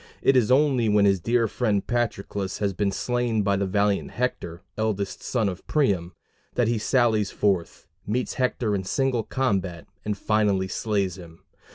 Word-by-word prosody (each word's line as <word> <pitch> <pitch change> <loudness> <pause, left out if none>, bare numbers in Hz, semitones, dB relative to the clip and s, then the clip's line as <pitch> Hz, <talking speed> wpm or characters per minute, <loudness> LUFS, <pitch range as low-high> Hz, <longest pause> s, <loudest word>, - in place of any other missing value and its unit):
It 135 - +4
is 120 -4 +3
only 130 -4 +3
when 105 -1 +4
his 100 -1 +3
dear 115 +5 +2
friend 105 -3 0
Patroclus 100 -5 -2
has 100 -2 -1
been 100 +1 0
slain 120 0 0
by 100 0 +2
the 100 0 0
valiant 100 +1 +1
Hector, 90 -9 -3
eldest 105 -3 -2
son 115 -5 0
of 95 -1 -5
Priam, 95 - +1 0.4
that 120 -2 +2
he 115 -1 +1
sallies 110 -3 +2
forth, 95 -5 -1 0.2
meets 120 +5 -1
Hector 125 -4 0
in 95 -2 -1
single 130 +4 0
combat, 100 -10 -1 0.2
and 105 -1 -2
finally 105 -3 +1
slays 100 -3 -1
him. 85 -2 -13
105 Hz, 165 wpm, -25 LUFS, 95-120 Hz, 0.4 s, It